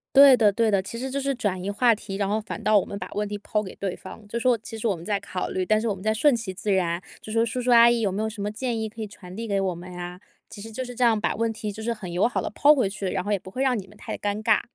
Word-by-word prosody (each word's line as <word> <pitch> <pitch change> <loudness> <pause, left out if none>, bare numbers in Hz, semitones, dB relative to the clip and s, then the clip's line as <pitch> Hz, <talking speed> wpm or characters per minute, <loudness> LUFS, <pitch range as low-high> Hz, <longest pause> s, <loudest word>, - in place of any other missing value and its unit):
对 275 -1 +10
的 215 -3 +4
对 225 +2 +2
的， 200 -2 +3
其 230 +5 -7
实 265 +1 -3
就 280 +1 -2
是 275 0 0
转 195 -7 -2
移 200 - -2
话 230 +2 +4
题。 195 -2 -7
然 200 -1 0
后 210 +2 +1
反 215 +1 -7
倒 215 0 +4
我 195 - +2
们 200 - -6
把 - - -5
问 210 +1 -1
题 205 0 -4
抛 210 +1 -2
给 190 - -8
对 195 -2 -3
方， 205 +3 -11
就 230 - -4
说 240 0 +3
“其 225 - -8
实 220 - -6
我 200 - +1
们 165 - -10
在 205 -1 +1
考 185 -2 -4
虑， 185 -1 -1
但 215 +3 +3
是 230 - -2
我 205 - 0
们 185 - -11
在 220 0 +2
顺 255 +4 +4
其 220 -5 -4
自 205 +2 -2
然。” 175 -2 +1 0.2
就 215 - -8
说 225 +1 +3
“叔 245 +2 -3
叔 245 0 +1
阿 235 0 +8
姨 235 -1 +2
有 200 -4 +1
没 205 +3 -2
有 220 - 0
什 215 -1 -8
么 205 +1 -2
建 240 +2 -2
议， 220 0 -2
可 225 +1 -9
以 215 - -3
传 185 -3 -12
递 230 +1 -5
给 200 -1 +1
我 185 -2 -1
们 180 +1 -9
啊？” 180 +1 -6 0.3
其 200 - -10
实 225 - -8
就 255 +4 -4
是 245 - -7
这 245 - -7
样 230 -3 +4
把 - - 0
问 230 +1 0
题 215 -1 -4
就 220 - -8
是 235 +1 -1
很 195 -6 -8
友 180 +5 +3
好 245 - -1
地 - - -3
抛 290 +7 +5
回 250 -8 +1
去， 200 0 -6
然 185 - -2
后 205 - -3
也 205 - +2
不 185 - -11
会 255 +7 -2
让 260 -3 +2
你 195 - -9
们 210 - -17
太 - - -6
尴 205 +1 -2
尬。 220 -1 +4
215 Hz, 380 characters per minute, -25 LUFS, 195-230 Hz, 0.3 s, 对